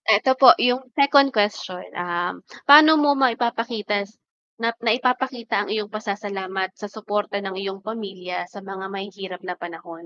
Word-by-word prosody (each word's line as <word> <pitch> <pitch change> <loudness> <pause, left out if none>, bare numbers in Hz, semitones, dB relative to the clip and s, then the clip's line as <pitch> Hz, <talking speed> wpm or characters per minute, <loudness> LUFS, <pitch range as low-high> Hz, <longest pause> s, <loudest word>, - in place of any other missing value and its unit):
Eto 260 +6 +2
po 260 -1 +9
yung 250 +1 +2 0.2
second 280 -1 +5
question, 205 -4 -2
um, 175 0 -3 0.2
pano 310 +2 +9
mo 290 -1 +3
maipapakitas 230 -5 -1 0.5
na 230 0 -1
naipapakita 245 -1 0
ang - - -9
iyong 215 -1 -2
pasasalamat 200 -3 -4
sa 210 -1 -9
suporta 210 -2 -3
ng 195 -1 -6
iyong 195 0 -5
pamilya 195 -4 -6
sa 200 - -10
mga 195 0 -8
mahihirap 195 -2 -7
na 180 - -4
panahon? 170 -1 -10
205 Hz, 145 wpm, -22 LUFS, 190-240 Hz, 0.5 s, po